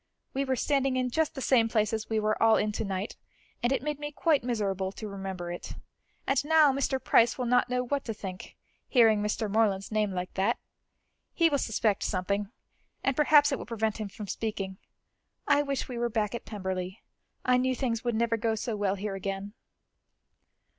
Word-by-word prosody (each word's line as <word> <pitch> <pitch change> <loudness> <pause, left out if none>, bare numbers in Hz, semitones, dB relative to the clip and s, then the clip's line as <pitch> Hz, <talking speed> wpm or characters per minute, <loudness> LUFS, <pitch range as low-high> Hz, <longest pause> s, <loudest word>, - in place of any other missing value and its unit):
We 275 +1 0
were 265 -1 +1
standing 270 0 +1
in 250 -1 0
just 320 +3 0
the 270 - -4
same 230 -4 +4
place 215 -1 +1
as 220 -1 -3
we 220 -1 +1
were 215 0 0
all 225 -1 +6
in 210 - 0
to 210 - -3
night, 195 0 -4 0.4
and 240 - +1
it 270 - 0
made 300 -1 -2
me 295 0 -4
quite 300 -2 +2
miserable 195 -6 -1
to 215 - -7
remember 190 -3 -5
it. 175 - -7 0.5
And 275 0 +2
now 305 -2 +5
Mr. 270 0 0
Price 235 +1 +4
will 250 - -2
not 245 +1 +3
know 250 0 0
what 280 +2 -1
to 225 - -3
think, 185 -3 -8 0.3
hearing 225 -5 +5
Mr. 210 +1 -1
Morland's 205 -2 +1
name 215 -2 +1
like 180 -1 -4
that. 190 0 +1 0.8
He 335 -1 +4
will 285 - +2
suspect 215 -3 0
something, 200 +1 -1 0.5
and 270 - +1
perhaps 295 0 +5
it 275 - -1
will - - -8
prevent 220 -2 -1
him 210 -2 -4
from 205 +2 -8
speaking. 195 -3 -4 0.7
I 290 0 +5
wish 280 -2 -2
we 245 -2 -5
were 240 0 0
back 215 -2 -1
at 235 - -5
Pemberley; 190 -1 -4 0.4
I 250 0 +4
knew 255 +1 +1
things 235 -3 -1
would 240 -2 0
never 230 0 +1
go 225 0 0
so 220 +1 -3
well 200 -2 0
here 200 +1 -4
again." 195 +1 -4
225 Hz, 200 wpm, -29 LUFS, 200-255 Hz, 0.8 s, all